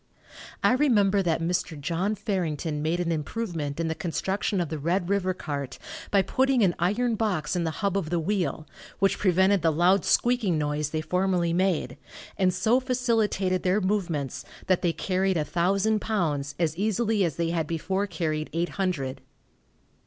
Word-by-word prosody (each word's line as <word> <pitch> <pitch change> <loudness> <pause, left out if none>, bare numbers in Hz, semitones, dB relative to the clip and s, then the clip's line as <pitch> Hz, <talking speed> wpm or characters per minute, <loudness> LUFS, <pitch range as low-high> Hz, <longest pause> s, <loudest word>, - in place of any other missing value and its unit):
I - - +5
remember 210 -8 +3
that 165 -3 0
Mr. 170 -2 -1
John 175 +8 -1
Farrington 165 -7 -2
made 160 +3 0
an 170 -1 0
improvement 160 -3 -3
in 165 - 0
the 160 - 0
construction 190 +4 -2
of 170 -4 -1
the 155 - -4
Red 175 +4 0
river 185 -2 +1
cart, 140 -7 -5 0.3
by 200 -1 +3
putting 260 +2 +2
an 180 -3 +3
iron 220 +8 +1
box 185 -9 -1
in 175 -1 0
the - - 0 0.2
hub 195 -1 +1
of 190 -6 -1
the 175 0 0
wheel, 175 -3 -1 0.3
which 195 0 +1
prevented 190 0 +3
the 165 0 +3
loud 175 +4 +3
squeaking 235 -8 +2
noise 150 0 -1
they 155 0 -2
formerly 180 +1 0
made, 185 -4 0 0.4
and 185 -2 +2
so 220 +7 +2
facilitated 225 -7 0
their 185 +3 +2
movements 175 -9 -2 0.2
that 185 -1 +2
they 175 - +2
carried 185 +3 0
a 155 - 0
thousand 195 +6 +1
pounds 150 -10 -1
as 160 -3 0
easily 215 +1 +1
as 165 -6 -1
they 165 -1 -1
had 165 -3 -1
before 190 +5 -1
carried 155 -4 -2
eight 170 +2 0
hundred. 145 -9 -1
180 Hz, 170 wpm, -26 LUFS, 160-200 Hz, 0.4 s, I